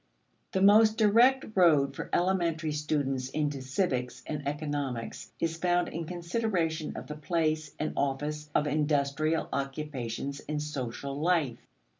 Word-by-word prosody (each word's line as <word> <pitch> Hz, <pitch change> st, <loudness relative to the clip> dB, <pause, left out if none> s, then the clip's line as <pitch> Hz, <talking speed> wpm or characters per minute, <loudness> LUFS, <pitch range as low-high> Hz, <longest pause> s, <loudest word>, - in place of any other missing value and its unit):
The 190 Hz, -, +2 dB
most 215 Hz, +2 st, +6 dB
direct 235 Hz, +5 st, +5 dB
road 160 Hz, -8 st, +4 dB
for -, -, -6 dB
elementary 170 Hz, -4 st, +1 dB
students 145 Hz, -3 st, -1 dB
into 145 Hz, -2 st, -1 dB
civics 130 Hz, -4 st, -1 dB
and 150 Hz, -2 st, -4 dB
economics 145 Hz, -5 st, -3 dB
is 165 Hz, 0 st, -1 dB
found 175 Hz, 0 st, +1 dB
in 165 Hz, 0 st, -4 dB
consideration 170 Hz, -2 st, -2 dB
of -, -, -6 dB
the 150 Hz, -, -6 dB
place 155 Hz, 0 st, -1 dB
and 155 Hz, -, -2 dB
office 150 Hz, +2 st, -2 dB
of 150 Hz, -, +3 dB
industrial 150 Hz, +1 st, +1 dB
occupations 140 Hz, -1 st, -3 dB
in 150 Hz, 0 st, -4 dB
social 140 Hz, -1 st, -4 dB
life. 155 Hz, -7 st, +1 dB
150 Hz, 130 wpm, -29 LUFS, 140-170 Hz, -, most